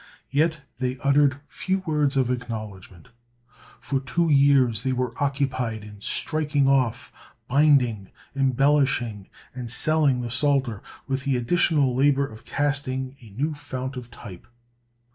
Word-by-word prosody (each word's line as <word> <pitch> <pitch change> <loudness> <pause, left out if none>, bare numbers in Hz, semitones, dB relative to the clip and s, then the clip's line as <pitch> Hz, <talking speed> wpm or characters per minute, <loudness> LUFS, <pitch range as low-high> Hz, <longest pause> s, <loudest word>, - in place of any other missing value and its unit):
Yet 155 +2 +1 0.2
they 130 0 -2
uttered 140 -1 +3
few 190 0 -2
words 150 -3 +1
of 130 -2 +2
acknowledgment. 110 -5 -7 0.7
For 135 - -2
two 160 +5 0
years 135 -6 +4
they 130 - -1
were 125 -2 -2
occupied 135 -6 -1
in 105 -1 -12
striking 150 +2 0
off, 130 -3 +1 0.3
binding, 130 -8 +3 0.3
embellishing, 135 -6 +1 0.2
and 125 -2 -6
selling 140 0 +1
the 120 -1 -5
Psalter, 130 -4 +1 0.2
with 135 -1 -2
the 135 -2 +1
additional 140 +1 +2
labor 140 +1 +3
of 115 -2 -12
casting 135 -2 -2
a 115 - -14
new 145 +10 -2
fount 130 -2 -6
of 125 -2 -8
type. 100 -6 -12
130 Hz, 130 wpm, -24 LUFS, 120-145 Hz, 0.7 s, years